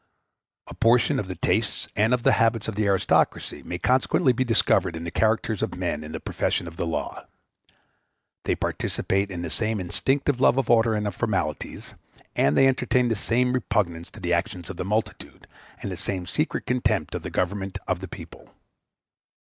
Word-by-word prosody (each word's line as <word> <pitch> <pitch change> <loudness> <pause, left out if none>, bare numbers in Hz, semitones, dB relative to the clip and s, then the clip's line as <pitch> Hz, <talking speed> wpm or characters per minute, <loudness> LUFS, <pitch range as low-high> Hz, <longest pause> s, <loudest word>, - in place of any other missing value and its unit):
A - - -10
portion 125 +4 +3
of 100 - -3
the 95 - -5
tastes - - 0
and 110 +3 +3
of 125 -1 +1
the - - +5
habits 115 -1 +2
of 110 - -2
the 105 0 0
aristocracy 100 -1 +1
may 90 - -5
consequently 130 +4 +2
be 130 - +1
discovered 105 -7 +2
in 80 - -6
the 85 - -4
characters 110 0 +1
of - - -2
men 85 -4 -2
in 75 - -8
the - - -5
profession - - -1
of 80 - -9
the 85 - -2
law. 80 - -4 1.2
They - - +1
participate 100 +1 -1
in 90 -2 -5
the 85 - -4
same 110 -1 0
instinctive 130 +9 0
love 130 - +5
of 135 -3 +1
order 115 -1 +4
and 105 0 -1
of 100 - -3
formalities; 95 - -3 0.4
and 70 +2 +3
they 135 - +6
entertain 125 -1 +2
the 115 - +1
same 125 +5 +1
repugnance 85 -9 -1
to - - -13
the 90 0 -1
actions 85 +1 -2
of 95 - -10
the - - -3
multitude, 105 +3 -3 0.4
and 100 - -3
the - - -3
same 95 -1 -3
secret 150 - -2
contempt 110 -9 0
of - - -3
the - - -5
government 95 +1 -2
of 90 -2 0
the 95 - -7
people. - - -11
105 Hz, 190 wpm, -25 LUFS, 90-120 Hz, 1.2 s, they